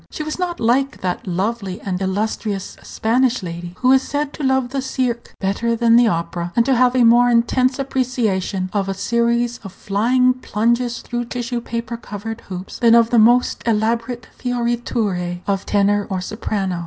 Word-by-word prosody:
She 305 Hz, -, -5 dB
was 310 Hz, +3 st, -5 dB
not 350 Hz, -1 st, -2 dB
like 260 Hz, +4 st, +1 dB
that 180 Hz, +1 st, -3 dB
lovely 195 Hz, +1 st, -2 dB
and 185 Hz, -1 st, -4 dB
illustrious 200 Hz, 0 st, -2 dB
Spanish 250 Hz, +1 st, 0 dB
lady 175 Hz, 0 st, -6 dB
who 255 Hz, 0 st, +4 dB
is 265 Hz, 0 st, +5 dB
said 290 Hz, +1 st, -3 dB
to -, -, -8 dB
love 265 Hz, -2 st, +1 dB
the 270 Hz, +1 st, -2 dB
cirque 255 Hz, -3 st, -3 dB
better 215 Hz, +4 st, 0 dB
than 230 Hz, 0 st, +4 dB
the 240 Hz, 0 st, +6 dB
opera, 170 Hz, -2 st, -2 dB
and 235 Hz, -, +3 dB
to 270 Hz, -, +3 dB
have 250 Hz, +1 st, +3 dB
a 250 Hz, -, +4 dB
more 240 Hz, +1 st, +6 dB
intense 250 Hz, +3 st, +2 dB
appreciation 225 Hz, -9 st, -1 dB
of 195 Hz, -2 st, -1 dB
a 195 Hz, -, -2 dB
series 235 Hz, +3 st, 0 dB
of 195 Hz, -, -10 dB
flying 240 Hz, +7 st, +2 dB
plunges 235 Hz, 0 st, -1 dB
through 240 Hz, 0 st, -3 dB
tissue 240 Hz, 0 st, -4 dB
paper 235 Hz, 0 st, -4 dB
covered 225 Hz, +1 st, -7 dB
hoops 185 Hz, 0 st, -7 dB
than 235 Hz, -1 st, +5 dB
of 230 Hz, -1 st, +4 dB
the 240 Hz, -, +5 dB
most 240 Hz, +3 st, +4 dB
elaborate 230 Hz, +2 st, 0 dB
fioriture 235 Hz, -7 st, -2 dB
of 195 Hz, -1 st, -2 dB
tenor 205 Hz, 0 st, +2 dB
or 190 Hz, -2 st, -2 dB
soprano. 190 Hz, -2 st, -3 dB
230 Hz, 175 wpm, -20 LUFS, 200-245 Hz, -, the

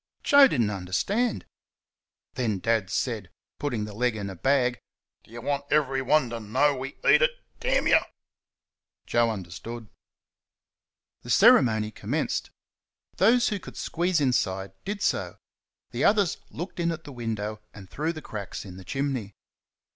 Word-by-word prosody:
Joe 285 Hz, -2 st, +8 dB
did 135 Hz, -, 0 dB
n't 105 Hz, -2 st, +1 dB
understand. 105 Hz, -, -1 dB, 0.9 s
Then 115 Hz, -5 st, -1 dB
Dad 110 Hz, -1 st, 0 dB
said 110 Hz, -4 st, -2 dB, 0.3 s
(putting 120 Hz, -7 st, -2 dB
the 105 Hz, -, -8 dB
leg 120 Hz, +2 st, 0 dB
in 100 Hz, -2 st, -4 dB
a -, -, -8 dB
bag): 125 Hz, +3 st, +1 dB, 0.4 s
"Do -, -, -23 dB
you 120 Hz, +1 st, -9 dB
want 140 Hz, 0 st, -2 dB
everyone 135 Hz, -2 st, +2 dB
to 115 Hz, -, -4 dB
know 130 Hz, +7 st, +2 dB
we 135 Hz, +1 st, -6 dB
eat -, -, +7 dB
it, -, -, +5 dB, 0.3 s
you?" -, -, +4 dB, 1.1 s
Joe 120 Hz, -1 st, +2 dB
understood. 110 Hz, +3 st, -7 dB, 1.3 s
The -, -, -11 dB
ceremony 110 Hz, -3 st, +5 dB
commenced. -, -, -2 dB, 0.7 s
Those 235 Hz, +6 st, +4 dB
who 205 Hz, -, -2 dB
could -, -, -11 dB
squeeze 175 Hz, 0 st, 0 dB
inside 95 Hz, -8 st, 0 dB
did 205 Hz, +1 st, -3 dB
so -, -, -1 dB, 0.5 s
the -, -, -2 dB
others 205 Hz, -4 st, +3 dB
looked 175 Hz, +3 st, -7 dB
in 170 Hz, 0 st, +1 dB
at 165 Hz, 0 st, -6 dB
the 145 Hz, -, -10 dB
window 110 Hz, -3 st, -4 dB
and 100 Hz, -3 st, -12 dB
through 155 Hz, -, -2 dB
the 155 Hz, -, -9 dB
cracks 100 Hz, -2 st, -6 dB
in 90 Hz, -2 st, -10 dB
the 95 Hz, -, -10 dB
chimney. 130 Hz, -4 st, -3 dB
125 Hz, 145 wpm, -26 LUFS, 105-155 Hz, 1.3 s, Joe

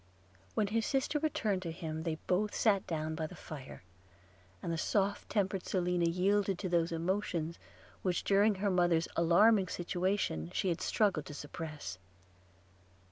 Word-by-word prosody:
When 215 Hz, -, +2 dB
his 220 Hz, +2 st, 0 dB
sister 275 Hz, +2 st, +1 dB
returned 220 Hz, -11 st, 0 dB
to 170 Hz, -3 st, -4 dB
him, 160 Hz, -1 st, -5 dB
they 160 Hz, -1 st, -1 dB
both 205 Hz, +3 st, +1 dB
sat 200 Hz, -4 st, +2 dB
down 160 Hz, -1 st, -2 dB
by 160 Hz, 0 st, -2 dB
the -, -, -11 dB
fire; 135 Hz, -10 st, -9 dB, 0.8 s
and 170 Hz, -, -1 dB
the -, -, 0 dB
soft 200 Hz, +2 st, 0 dB
tempered 195 Hz, -3 st, 0 dB
Selina 180 Hz, -2 st, +1 dB
yielded 195 Hz, +2 st, +2 dB
to 185 Hz, 0 st, -3 dB
those 170 Hz, -1 st, +2 dB
emotions, 170 Hz, -1 st, -1 dB, 0.4 s
which 180 Hz, -2 st, 0 dB
during 205 Hz, +1 st, +4 dB
her 200 Hz, +1 st, 0 dB
mother's 175 Hz, -2 st, +3 dB
alarming 190 Hz, +4 st, +5 dB
situation 175 Hz, -, -1 dB
she 190 Hz, -, +1 dB
had 170 Hz, -, -1 dB
struggled 185 Hz, -10 st, +1 dB
to 145 Hz, -, -7 dB
suppress. 145 Hz, -, -6 dB
180 Hz, 150 wpm, -33 LUFS, 165-205 Hz, 0.8 s, alarming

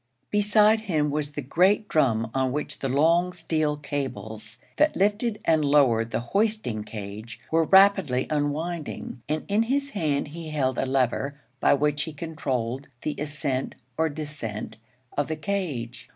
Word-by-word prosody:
Beside 210 Hz, +1 st, +4 dB
him 155 Hz, -9 st, 0 dB
was 145 Hz, 0 st, -2 dB
the 145 Hz, -, -4 dB
great 190 Hz, -, +3 dB
drum 115 Hz, -, +2 dB
on 130 Hz, -1 st, +1 dB
which 150 Hz, +3 st, -3 dB
the 135 Hz, -, -2 dB
long 165 Hz, +6 st, +3 dB
steel 155 Hz, -3 st, -1 dB
cables 120 Hz, -6 st, -5 dB, 0.2 s
that 300 Hz, +1 st, +3 dB
lifted 210 Hz, +3 st, +1 dB
and 160 Hz, -2 st, +3 dB
lowered 130 Hz, -6 st, +4 dB
the 115 Hz, -, -1 dB
hoisting 205 Hz, -, 0 dB
cage 105 Hz, +1 st, -8 dB
were 165 Hz, 0 st, +3 dB
rapidly 190 Hz, -9 st, +5 dB
unwinding, 150 Hz, -2 st, -2 dB
and 155 Hz, +1 st, -1 dB
in 205 Hz, +2 st, +2 dB
his 275 Hz, +4 st, 0 dB
hand 150 Hz, -, -1 dB
he 160 Hz, +1 st, -7 dB
held 130 Hz, -4 st, 0 dB
a 135 Hz, -, 0 dB
lever 135 Hz, +2 st, 0 dB, 0.2 s
by -, -, +5 dB
which 145 Hz, 0 st, 0 dB
he 160 Hz, -, -7 dB
controlled 135 Hz, -5 st, -3 dB, 0.2 s
the 150 Hz, -, -1 dB
ascent 145 Hz, -3 st, -2 dB, 0.2 s
or 160 Hz, 0 st, +1 dB
descent 145 Hz, -9 st, -6 dB, 0.4 s
of 145 Hz, -, 0 dB
the 160 Hz, -, -2 dB
'cage.' 145 Hz, -9 st, -4 dB
150 Hz, 150 wpm, -26 LUFS, 130-175 Hz, 0.4 s, rapidly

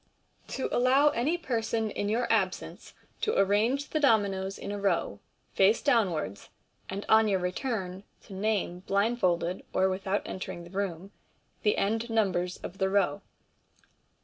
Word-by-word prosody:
to 265 Hz, -, -3 dB
allow 265 Hz, +4 st, +4 dB
amy 295 Hz, +5 st, 0 dB
person 225 Hz, -7 st, -1 dB
in 205 Hz, 0 st, -2 dB
your 235 Hz, +3 st, +1 dB
absence 190 Hz, -4 st, -2 dB, 0.3 s
to 435 Hz, -, 0 dB
arrange 220 Hz, +9 st, +2 dB
thb 310 Hz, -, 0 dB
Dominoes 195 Hz, -7 st, +2 dB
in 200 Hz, -, -6 dB
a 205 Hz, -, -4 dB
Row, 175 Hz, -, 0 dB, 0.3 s
face 200 Hz, +4 st, +4 dB
downwards, 185 Hz, -, 0 dB, 0.4 s
and 195 Hz, +2 st, -4 dB
on 220 Hz, 0 st, +5 dB
your 200 Hz, -2 st, +2 dB
return 185 Hz, 0 st, -3 dB, 0.2 s
to 200 Hz, -, -12 dB
name 195 Hz, -3 st, -1 dB
blindfold, 190 Hz, -3 st, 0 dB
or 190 Hz, +1 st, +3 dB
without 190 Hz, +1 st, -1 dB
entering 180 Hz, -2 st, -6 dB
the 170 Hz, -, -13 dB
Room, 195 Hz, -1 st, -3 dB, 0.5 s
the 210 Hz, -, +2 dB
end 225 Hz, +4 st, 0 dB
numbers 185 Hz, -5 st, 0 dB
of 190 Hz, -, -7 dB
the 190 Hz, 0 st, +2 dB
Row. 190 Hz, -7 st, +1 dB
200 Hz, 145 wpm, -29 LUFS, 185-225 Hz, 0.5 s, on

